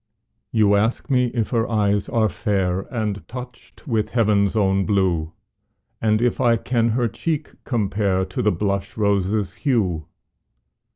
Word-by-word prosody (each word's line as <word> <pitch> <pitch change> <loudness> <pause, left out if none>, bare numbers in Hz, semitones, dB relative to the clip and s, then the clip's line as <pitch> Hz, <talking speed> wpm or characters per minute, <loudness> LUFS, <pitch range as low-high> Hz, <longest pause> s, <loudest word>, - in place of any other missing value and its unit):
You 105 -2 +4
ask 110 +7 0
me 125 -1 +3
if 115 -2 -2
her 115 -2 +1
eyes 105 -3 +1
are 110 -2 +2
fair, 95 -2 -1
And 105 - -3
touched 125 +2 -10
with 110 -4 0
heaven's 105 -4 +2
own 95 -2 +2
blue, 90 -6 +1 0.7
And 110 +1 +2
if 120 - +1
I 115 -1 +4
can 115 0 0
her 120 +1 +1
cheek 155 +7 -3
compare 100 -5 0
To - - -4
the 105 - +3
blush 100 +3 -2
rose's 100 -1 +1
hue? 95 - 0
105 Hz, 140 wpm, -22 LUFS, 100-115 Hz, 0.7 s, You